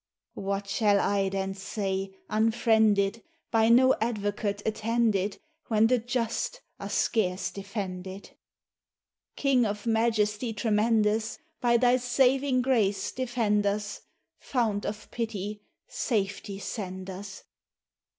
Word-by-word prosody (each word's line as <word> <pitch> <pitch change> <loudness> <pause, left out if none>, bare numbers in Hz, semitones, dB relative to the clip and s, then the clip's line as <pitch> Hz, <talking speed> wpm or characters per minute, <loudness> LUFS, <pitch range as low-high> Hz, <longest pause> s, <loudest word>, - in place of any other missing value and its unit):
What 200 0 -2
shall 205 0 +3
I 195 -1 +1
then 195 0 -2
say, 195 0 -3 0.2
unfriended, 220 -1 +2 0.3
By 225 -1 +4
no 260 +3 +6
advocate 205 -2 -1
attended, 220 -2 0 0.3
When 220 -1 +4
the 250 +2 +3
just 240 - -2 0.2
are - - -5
scarce 185 -5 0
defended? 195 -1 -6 1.0
King 270 -3 +3
of 205 0 -2
majesty 225 0 +1
tremendous, 215 0 +1 0.2
By 235 -1 +3
thy 245 +1 +4
saving 255 +1 +2
grace 210 -7 +1
defend 230 -5 0
us, 205 +1 -2 0.4
Fount 220 -6 -1
of 210 0 -6
pity, 210 -3 -4 0.3
safety 200 -3 -2
send 190 -2 -5
us! 195 +1 -8
215 Hz, 105 wpm, -28 LUFS, 200-235 Hz, 1.0 s, no